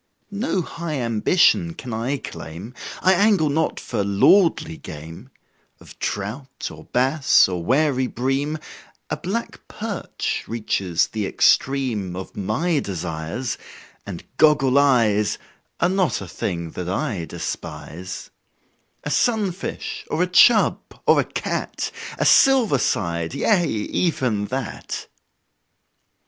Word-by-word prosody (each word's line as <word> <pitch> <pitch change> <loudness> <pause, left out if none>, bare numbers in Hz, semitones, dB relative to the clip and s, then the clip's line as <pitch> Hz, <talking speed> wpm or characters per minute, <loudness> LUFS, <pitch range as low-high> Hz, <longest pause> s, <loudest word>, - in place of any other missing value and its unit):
No 200 -3 0
high 165 -1 -5
ambition 165 - +3
can 125 -7 -7
I 120 +6 -1
claim 90 -1 -8 0.3
I 185 - +6
angle 195 -5 +3
not 160 +3 0
for 100 - -2
lordly 100 - +4
game 80 +2 -10 0.5
Of - - -15
trout, 115 +7 -4
or - - -12
bass, 130 +2 +4
or 90 -2 -3
wary 130 - +2
bream 135 +6 -1 0.5
A - - 0
black 225 +6 -4
perch 210 -3 -4
reaches 100 -6 0
the 105 -3 -2
extreme 120 -11 +2
Of 95 +1 -7
my 140 - 0
desires; 90 +3 -4 0.4
and 95 -4 -7
"goggle 140 -3 +5
eyes" 115 -7 +3 0.4
Are - - +3
not 185 -2 +1
a 95 - -7
thing 85 -1 -4
that 90 -1 -5
I 100 - -2
despise; 80 +4 -6 0.7
A 150 - -3
sunfish, 200 - -1
or 160 +3 +1
a - - +3
"chub," 215 +5 +5 0.3
or - - +5
a - - +3
"cat" - - -3 0.3
A - - 0
"silver 250 - +5
side" 85 -8 -1
yea, 200 -6 +3
even 110 - 0
that! 130 +2 -5
130 Hz, 120 wpm, -22 LUFS, 100-165 Hz, 0.7 s, I